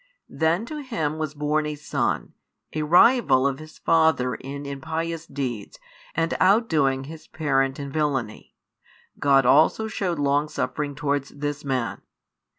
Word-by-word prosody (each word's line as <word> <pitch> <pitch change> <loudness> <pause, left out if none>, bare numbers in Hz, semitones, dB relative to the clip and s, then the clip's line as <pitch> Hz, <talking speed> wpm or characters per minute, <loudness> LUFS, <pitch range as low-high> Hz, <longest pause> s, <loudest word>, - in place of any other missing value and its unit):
Then 165 +6 0
to 300 +4 -6
him 160 - -3
was 155 -1 -3
born 150 +1 0
a 150 - -3
son, 145 - -2 0.4
a 155 - -2
rival 160 - +5
of 140 -1 0
his 155 0 -12
father 160 -6 +2
in 140 +2 -7
impious 160 +3 -4
deeds 125 -7 -5 0.4
and 165 0 0
outdoing 160 - +3
his 155 +3 -10
parent 135 -3 0
in 140 -1 -5
villainy: 135 -7 -2 0.6
God 135 -2 +4
also 155 - +4
shewed 190 -5 -2
longsuffering 145 0 -1
towards 140 -1 -1
this 145 0 -4
man. 130 -4 -2
150 Hz, 135 wpm, -24 LUFS, 140-160 Hz, 0.6 s, rival